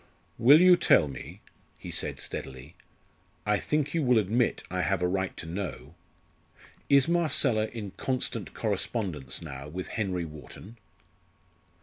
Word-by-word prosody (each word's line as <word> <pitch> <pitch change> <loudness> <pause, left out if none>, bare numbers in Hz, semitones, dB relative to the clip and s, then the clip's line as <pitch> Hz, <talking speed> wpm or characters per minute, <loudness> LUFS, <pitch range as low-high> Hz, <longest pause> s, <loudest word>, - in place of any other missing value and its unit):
"Will 140 +7 +8
you 180 -1 +7
tell 85 - +4
me," 70 -2 -9 0.4
he - - -8
said - - -2
steadily 65 +2 -7 0.7
"I - - +2
think 150 -1 -1
you 165 - +1
will 125 -4 +4
admit 110 +4 +1
I 90 0 -1
have 90 +2 0
a - - +3
right 95 +1 -2
to - - -6
know 85 -5 -6 1.0
is 140 +1 +5
Marcella 140 -10 +2
in 110 -5 -7
constant 125 -5 -3
correspondence 100 - -2
now 70 -3 -7
with 90 +5 -6
Henry 95 -6 -2
Wharton?" 80 +8 -11
100 Hz, 135 wpm, -28 LUFS, 85-125 Hz, 1.0 s, Will